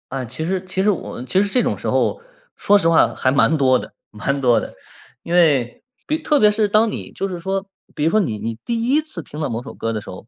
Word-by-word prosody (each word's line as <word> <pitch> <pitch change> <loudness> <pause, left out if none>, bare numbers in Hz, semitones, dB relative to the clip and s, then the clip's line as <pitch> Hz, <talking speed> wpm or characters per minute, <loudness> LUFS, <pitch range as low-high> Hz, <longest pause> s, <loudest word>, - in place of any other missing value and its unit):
啊， 135 -1 -3
其 130 +7 -5
实 185 +3 -1
其 190 0 -1
实 210 - +3
我 180 -10 -3
其 130 +10 +1
实 205 - +1
这 250 +3 +2
种 - - -1
时 - - -4
候， - - 0 0.4
说 205 - +4
实 165 -5 +3
话 165 - +3
还 130 - +1
蛮 140 +3 +3
多 130 -3 +3
的 - - -10 0.2
蛮 140 +7 -2
多 120 -3 +4
的。 - - -7 0.5
因 170 - -5
为 145 -9 +2 0.2
比 310 - -1
特 310 -1 +2
别 210 -5 +5
是 210 0 +1
当 215 +2 +3
你 - - -7
就 195 - -3
是 180 -2 -5
说 195 +2 -3 0.3
比 - - -2
如 160 - +3
说 215 - +3
你 120 - -1
你 110 +2 -5
第 230 -1 -2
一 275 +6 +2
次 310 0 +1
听 150 - -9
到 155 - -1
某 115 +1 -4
首 140 - -9
歌 115 - -3
的 110 - -3
时 - - -10
候， 90 - -10
165 Hz, 285 characters per minute, -20 LUFS, 130-205 Hz, 0.5 s, 别